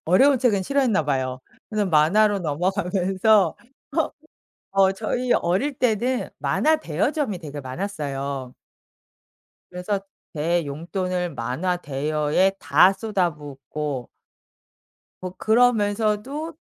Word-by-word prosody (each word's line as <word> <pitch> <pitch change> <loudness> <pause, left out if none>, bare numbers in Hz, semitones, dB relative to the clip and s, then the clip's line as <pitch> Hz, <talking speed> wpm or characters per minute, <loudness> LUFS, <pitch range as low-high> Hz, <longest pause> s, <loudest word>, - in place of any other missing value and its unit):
어려운 265 - +5
책은 225 -6 +2
싫어했나 250 - +1
봐요. 130 -2 -1 0.3
그래서 210 -2 0
만화로 195 +6 +4
넘어가면서 185 +4 +1 0.4
어 - - +1 0.6
어 195 -1 +4
저희 240 +5 -1
어릴 195 +12 +1
때는 250 0 0
만화 315 +1 +2
대여점이 210 - -1
되게 150 -3 -7
많았어요. 140 -4 -4 1.2
그래서 180 +3 -2 0.3
제 170 +3 0
용돈을 180 +4 -3
만화 165 +10 -1
대여에 150 +4 0
다 155 +7 +5
쏟아붓고 150 - -3 1.1
뭐 185 -1 -5
그러면서도 225 - +1
185 Hz, 235 characters per minute, -23 LUFS, 150-215 Hz, 1.2 s, 어려운